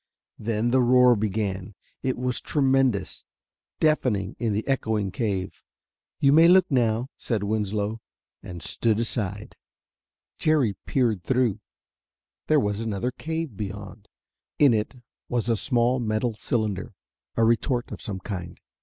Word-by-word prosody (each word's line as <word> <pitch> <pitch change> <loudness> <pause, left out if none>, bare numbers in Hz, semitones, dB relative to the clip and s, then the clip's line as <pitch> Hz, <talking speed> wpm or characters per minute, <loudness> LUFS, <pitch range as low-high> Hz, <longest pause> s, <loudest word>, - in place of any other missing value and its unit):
Then 115 +2 0
the 130 +1 +4
roar 125 0 +6
began. 100 -2 -2 0.3
It 130 - -1
was 125 0 -1
tremendous, 135 -6 +1 0.6
deafening, 125 - +1
in 115 -3 0
the 105 +2 -2
echoing 110 -7 0
cave. 100 -4 -3 0.6
"You 140 0 +4
may 165 +2 +7
look 185 +1 +6
now," 120 -1 +1
said 110 -4 -2
Winslow, 105 +1 -1 0.4
and 85 -2 -8
stood 110 -2 +1
aside. 105 -3 -3 0.8
Jerry 140 -10 +2
peered 115 -8 +1
through. 125 0 +1 0.9
There 155 -1 +4
was 105 -4 -1
another 115 +2 -2
cave 160 -2 -4
beyond. 100 0 -7 0.5
In 140 -5 +6
it 110 +4 -1 0.3
was 120 -1 -1
a 115 - +3
small 125 +2 +1
metal 110 +1 -1
cylinder, 105 -3 -2 0.4
a 115 - +2
retort 120 +2 +1
of - - -7
some 100 -5 -5
kind. 90 -2 -6
115 Hz, 130 wpm, -25 LUFS, 105-125 Hz, 0.9 s, may